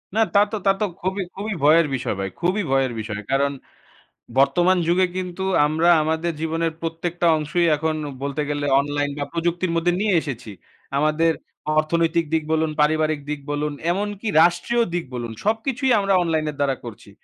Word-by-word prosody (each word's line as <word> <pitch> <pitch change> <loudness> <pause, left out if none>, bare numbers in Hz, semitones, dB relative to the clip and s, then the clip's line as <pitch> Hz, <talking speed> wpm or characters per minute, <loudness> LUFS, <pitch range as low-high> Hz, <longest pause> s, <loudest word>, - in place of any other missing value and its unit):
না, - - +2
তা 200 - +6
তো, - - -2
তা 195 - +6
তো 210 - +1 0.2
খুবই, 190 +2 -1
খুবই 205 +2 -4
ভয়ের 155 +1 +5
বিষয় 120 -4 -2
ভাই। 95 0 -2
খুবই 185 +4 +1
ভয়ের 135 -1 +2
বিষয়। 105 -1 -4
কারণ 140 +1 +2 0.9
বর্তমান 175 +7 +4
যুগে 180 +2 +3
কিন্তু 185 0 -4 0.2
আমরা 160 +3 +2
আমাদের 160 +2 -1
জীবনের 165 0 -1
প্রত্যেকটা 170 +1 -2
অংশই 170 +3 0
এখন 155 +1 -1 0.3
বলতে 140 +1 -2
গেলে 145 0 -2
অনলাইন 145 0 -1
বা 145 - -2
প্রযুক্তির 170 +1 -1
মধ্যে 165 +1 +2
নিয়ে 210 -1 +1
এসেছি। 120 -7 -6 0.5
আমাদের 155 +3 +2 0.5
অর্থনৈতিক 165 +1 +2
দিক 160 -1 +2
বলুন, 160 0 +1
পারিবারিক 155 0 +1
দিক 150 -1 -2
বলুন, 145 0 -2 0.2
এমনকি 205 +3 -3
রাষ্ট্রীয় 175 +8 +3
দিক 175 -1 -2
বলুন 120 -2 -4
সবকিছুই 245 +5 0
আমরা 195 -1 +1
অনলাইনের 155 -3 -1
দ্বারা 140 -2 +1
করছি। 105 -3 -10
165 Hz, 165 wpm, -22 LUFS, 145-180 Hz, 0.9 s, তা